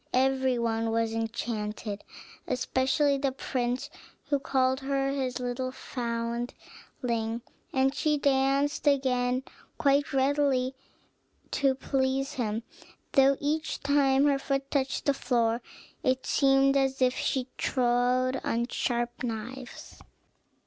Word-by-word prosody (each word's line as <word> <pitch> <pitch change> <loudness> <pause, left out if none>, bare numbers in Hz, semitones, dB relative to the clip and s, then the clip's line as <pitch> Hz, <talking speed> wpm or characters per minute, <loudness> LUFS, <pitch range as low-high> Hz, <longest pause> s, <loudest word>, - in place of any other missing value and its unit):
Every 260 -1 +2
one 225 -1 0
was 225 0 0
enchanted, 220 -2 -3 0.4
especially 265 +3 +1
the 275 -1 +1
prince, 250 -1 -2 0.4
who 285 -1 +2
called 260 -1 +1
her 275 0 0
his 260 -3 -2
little 250 +1 -2
foundling; 235 -1 -4 0.3
and 265 0 +2
she 300 +1 +1
danced 275 +1 +1
again 255 -2 +2 0.3
quite 280 0 +2
readily, 270 -1 +2 0.8
to 270 -2 +2
please 270 0 0
him, 225 -2 -2 0.5
though 275 0 +5
each 305 +2 -1
time 280 -1 +3
her 280 -1 +3
foot 275 0 -2
touched 270 -2 0
the 280 - +4
floor 235 -3 +1 0.4
it 260 0 0
seemed 275 0 +4
as 270 -1 +1
if 255 -1 +3
she 260 -2 -1
trod 250 +1 +1
on 235 +1 -1
sharp 240 -1 -1
knives. 245 +2 -6
260 Hz, 115 wpm, -28 LUFS, 240-275 Hz, 0.8 s, though